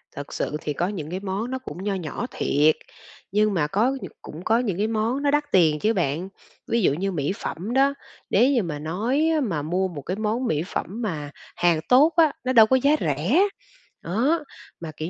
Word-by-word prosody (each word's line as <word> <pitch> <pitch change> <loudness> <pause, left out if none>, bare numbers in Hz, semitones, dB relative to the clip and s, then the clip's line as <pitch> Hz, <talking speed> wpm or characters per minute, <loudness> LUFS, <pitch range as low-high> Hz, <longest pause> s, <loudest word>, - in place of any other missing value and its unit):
Thật 145 0 -7
sự 150 - -2
thì 150 - -3
có 175 +5 -1
những 165 -7 -5
cái 185 - -3
món 200 +5 -3
nó 260 - -2
cũng 195 -7 -8
nho 205 0 -1
nhỏ 180 +5 -4
thiệt, 150 +2 +2 0.6
nhưng 210 +1 +2
mà 155 -5 +1
có 210 +9 +2
nh - - -5 0.2
cũng 160 +4 -9
có 225 +3 +3
những 210 -8 -1
cái 210 +2 +1
món 225 +4 -1
nó 285 - +3
đắt 295 +1 +2
tiền 160 -5 +4
chứ 220 +8 +2
bạn. 175 -1 -1 0.4
Ví 235 - +1
dụ 175 - +3
như 195 +6 -2
mỹ 150 -4 -1
phẩm 200 +6 -5
đó, 275 +2 +4 0.4
nếu 260 +3 +4
như 245 -6 +2
mà 155 -4 -4
nói 225 - 0
á 310 - +1
mà 180 - -1
mua 180 +5 0
một 165 -6 -7
cái 185 +7 -4
món 220 +4 -1
mỹ 155 -4 0
phẩm - - -3 0.2
mà 155 -10 -3 0.2
hàng 175 -2 +2
tốt 285 +6 +6
á, 320 -3 +6
nó 255 0 0
đâu 225 -3 +8
có 260 - +3
giá 280 +3 +3
rẻ. 160 - +2 0.6
Đó, 260 - +1 0.4
mà, 165 -2 -6
kiểu 160 +2 -4
195 Hz, 225 wpm, -24 LUFS, 160-245 Hz, 0.6 s, đâu